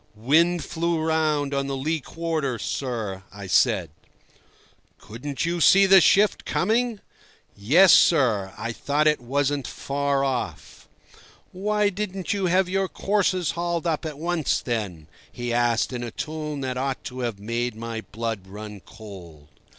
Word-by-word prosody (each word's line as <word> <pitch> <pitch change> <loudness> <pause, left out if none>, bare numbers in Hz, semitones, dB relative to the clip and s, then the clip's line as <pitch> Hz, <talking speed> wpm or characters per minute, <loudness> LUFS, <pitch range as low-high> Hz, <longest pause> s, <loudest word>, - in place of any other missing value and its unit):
"Wind 160 +9 +2
flew 170 0 -1
round 155 -3 0
on 140 0 -1
the 135 -1 -3
lee 155 +4 -1
quarter, 155 -3 -3
sir," 110 -6 -4
I 100 0 -9
said. 90 -3 +2 1.1
"Couldn't 130 +7 -5
you 170 0 -1
see 195 +7 +7
the 190 -1 +7
shift 205 +4 +4
coming?" 225 +2 0 0.5
"Yes, 160 - +6
sir, 115 - +4
I 115 - -3
thought 145 +6 0
it 150 -3 +3
wasn't 140 +2 -1
very - - -9
far 140 0 0
off." 130 -3 -4 0.6
"Why 210 +2 +1
didn't 195 -1 -3
you 195 -2 0
have 185 +1 +3
your 190 +1 0
courses 190 -3 0
hauled 170 0 -2
up 165 -1 -1
at 155 -3 -5
once, 165 -1 0
then?" 100 -10 -4 0.2
he 120 -1 -4
asked 120 0 +1
in 120 - -4
a 120 - -4
tone 150 +2 -5
that 130 -1 -3
ought 135 0 -3
to 130 0 -7
have 120 -4 -2
made 115 +3 -2
my 115 0 -5
blood 110 -4 -4
run 105 +1 -9
cold. 90 -9 -13
140 Hz, 150 wpm, -24 LUFS, 115-170 Hz, 1.1 s, see